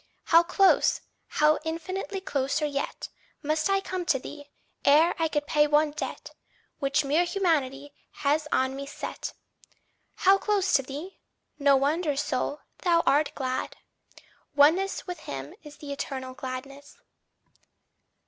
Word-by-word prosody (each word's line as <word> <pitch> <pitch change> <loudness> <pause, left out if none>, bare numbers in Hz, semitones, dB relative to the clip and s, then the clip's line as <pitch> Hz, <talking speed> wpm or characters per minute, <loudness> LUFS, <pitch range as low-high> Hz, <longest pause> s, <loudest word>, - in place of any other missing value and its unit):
How 335 0 +6
close, 360 +3 +3 0.3
how 300 0 +3
infinitely 370 +4 -4
closer 285 -2 -1
yet 280 -1 -4 0.3
Must 310 +4 0
I 390 0 +2
come 370 -2 -4
to 300 - +3
thee, 290 +2 -10 0.3
ere 305 +4 +5
I 325 - +2
can 295 -1 -1
pay 295 0 +2
one 295 +1 +3
debt 300 - -6 0.5
Which 275 0 +1
mere 300 +5 +3
humanity 290 -7 -1 0.3
has 300 +2 +2
on 260 +1 +1
me 275 0 -6
set! - - -6 0.8
"How 390 +1 +4
close 400 -3 0
to 275 - +5
thee!" 290 +8 -8 0.4
no 280 -1 +5
wonder, 295 +3 +1
soul, 290 0 -2 0.2
thou 340 -2 +3
art 295 +2 +3
glad! 260 -1 -3 0.8
Oneness 330 +7 +3
with 360 -3 -6
him 135 - -7
is 295 -1 -12
the 285 -2 -6
eternal 260 -2 -5
gladness. 275 +1 -8
295 Hz, 135 wpm, -27 LUFS, 275-335 Hz, 0.8 s, How